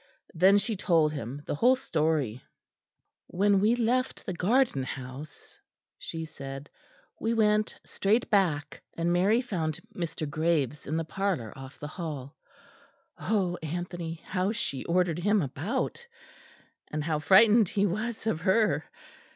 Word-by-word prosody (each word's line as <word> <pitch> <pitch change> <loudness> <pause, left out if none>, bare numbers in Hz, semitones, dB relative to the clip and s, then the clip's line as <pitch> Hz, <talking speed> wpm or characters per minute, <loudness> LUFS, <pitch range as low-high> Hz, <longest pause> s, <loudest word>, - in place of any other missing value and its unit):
Then 190 +4 +5
she 215 +2 -1
told 165 -6 +2
him 140 +1 -6
the - - -2
whole 245 - +4
story. 155 - -1 0.8
"When 200 +2 +3
we 215 +4 +3
left 245 +2 0
the 185 - -3
garden 210 - +2
house," 130 +3 -8 0.4
she 160 0 -5
said, 135 -2 -8 0.5
"we 230 +1 0
went 215 -1 +2
straight 215 +5 +1
back, 170 -8 +1 0.2
and 170 +1 +1
Mary 200 +7 +3
found 170 - -3 0.2
Mr. 165 -3 -3
Graves 150 -2 0
in 155 +3 -1
the 165 - -1
parlour 180 - -2
off 135 0 -10
the 150 - -5
hall. 150 -4 -6 0.8
Oh, 190 -5 0
Anthony, 170 0 -5
how 185 +1 0
she 175 - -3
ordered 175 -1 +1
him 205 +4 +3
about! 175 - -3 0.8
And 150 0 -2
how 155 -1 0
frightened 210 +5 +6
he 200 0 +1
was 215 +4 -3
of 165 -8 0
her! 210 +4 +2
175 Hz, 135 wpm, -28 LUFS, 150-210 Hz, 0.8 s, frightened